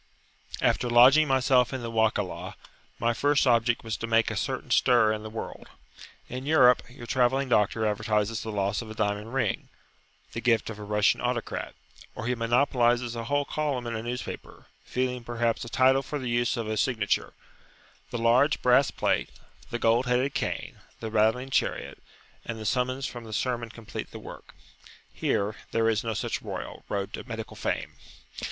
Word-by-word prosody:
After 120 - +2
lodging 130 +6 +7
myself 130 -2 +3
in 130 -2 -4
the 115 - -4
Wakalah, 110 -1 0 0.4
my 120 +1 +1
first 145 +4 +2
object 120 -1 +3
was 110 -2 -3
to 115 - -4
make 115 0 +3
a - - -4
certain - - -3
stir 110 -3 +4
in 105 - -4
the 110 - -7
world. 110 +1 -7 0.6
In 130 +2 -6
Europe 130 -5 +6
your 125 -1 -11
travelling 130 +2 +1
doctor 110 0 +2
advertises 105 +1 0
the 110 - -5
loss 100 +1 -1
of 115 - -9
a 110 - -8
diamond 105 +2 -2
ring, 135 - -1 0.6
the 115 - -4
gift 115 -2 +2
of 105 - -9
a - - -7
Russian 105 0 +2
autocrat; 125 -1 -3 0.4
or 110 - -5
he 125 - +1
monopolises 120 0 +2
a 115 0 -4
whole 145 +3 +1
column 140 -5 -2
in 115 -1 -3
a 110 - -3
newspaper, 120 +2 -6 0.2
feeing 125 -1 -2
perhaps 120 -1 -1
a 115 - -7
title 130 +2 +4
for 145 +2 -5
the 130 -3 -4
use 120 +1 +1
of 115 -2 -3
a 110 0 -2
signature; 110 -4 0 0.8
the 120 - -3
large 120 +6 +3
brass 125 +2 +5
plate, - - 0 0.4
the 120 - -2
gold 120 +2 +2
headed 125 +3 +1
cane, - - -3 0.2
the 110 - -5
rattling 110 +5 +2
chariot, - - -1 0.4
and 115 - -5
the 110 - -7
summons 130 +3 0
from 120 -1 -6
the 110 -1 -9
sermon 120 0 -1
complete 115 -1 -7
the - - -9
work. - - -11 0.6
Here, 100 +2 -1
there 115 0 +1
is 110 -1 +1
no 115 -1 -2
such - - -2
Royal - - -6
[p.51]Road 100 0 -2
to - - -7
medical 115 -1 -6
fame. - - -3
120 Hz, 180 wpm, -27 LUFS, 110-125 Hz, 0.8 s, lodging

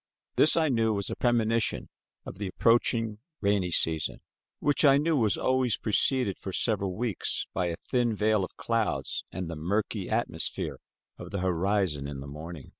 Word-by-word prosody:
This 155 - +5
I 160 -1 +3
knew, 115 -4 +2
was 100 -1 -2
a - - -2
premonition 115 -2 +1 0.4
of 95 - -8
the 100 - -2
approaching 115 +1 +2 0.2
rainy 100 -3 +1
season, 80 -2 0 0.4
which 145 +1 +1
I 140 -2 +7
knew 160 +3 +2
was 110 -7 +2
always 130 -4 +1
preceded 110 -1 +1
for 95 - -5
several 100 -2 0
weeks 115 -3 -2
by 90 - 0
a 85 - -2
thin 120 +3 0
veil 105 -1 +2
of 90 - -7
clouds 115 -2 -1
and 90 0 -4
the 85 - -5
murky 100 +4 -2
atmosphere 110 -7 -2 0.4
of - - -8
the 100 - -3
horizon 90 -4 0
in 70 -1 -6
the 70 - -7
morning. 75 0 -8
105 Hz, 170 wpm, -28 LUFS, 90-115 Hz, 0.4 s, I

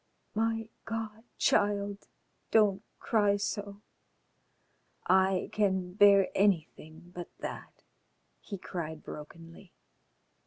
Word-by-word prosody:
"My 225 0 0 0.2
God! 225 0 -5
child, 200 0 +1 0.4
don't 205 -3 +4 0.2
cry 205 -2 +2
so. 205 0 -4 1.2
I 190 0 +3
can 190 -3 0
bear 200 -1 +6
anything 170 -3 -1
but 175 -1 -7
that," - - -8 0.6
he 200 - -7
cried 160 -4 -6
brokenly. 165 +4 -11
200 Hz, 85 wpm, -30 LUFS, 180-210 Hz, 1.2 s, bear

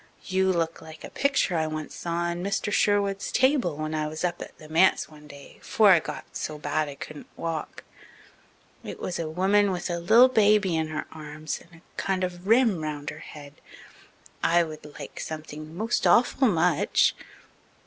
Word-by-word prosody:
You 190 0 +2
look 165 -2 -1
like 160 0 -12
a - - -8
picture 280 -10 +1
I 160 -1 +1
once 155 0 -5
saw 170 0 -3
on 175 +1 -4
Mr. 200 +1 -1
Sherwood's 200 -1 +1
table 260 - +2
when 155 0 -3
I 155 -1 -1
was 155 +2 -6
up 175 0 -2
at - - -9
the 155 - -13
manse 165 +5 +3
one 150 -1 -15
day 140 -1 -13
'fore 215 -3 +4
I 175 - +7
got - - -8
so 155 - -4
bad 150 0 -1
I 140 - -8
couldn't 150 +1 -9
walk. 165 -2 -4 1.0
It - - -7
was 175 - -4
a 160 -2 -3
woman 195 +5 +3
with 180 -1 -3
a 170 - -2
li'l 225 +9 +7
baby 210 -6 +3
in 160 -1 0
her 155 0 -4
arms 155 0 -6
and 165 -1 -18
a - - -8
kind 190 -1 -1
of 180 0 -4
rim 225 -6 +4
round 150 -2 -4
her 150 - -10
head. 145 -2 -12 0.8
I 170 +1 +4
would 155 -2 -9
like - - -8
something 155 +1 -7
most 225 +4 0
awful 255 +2 +4
much." 175 -5 +3
170 Hz, 185 wpm, -26 LUFS, 155-195 Hz, 1.0 s, I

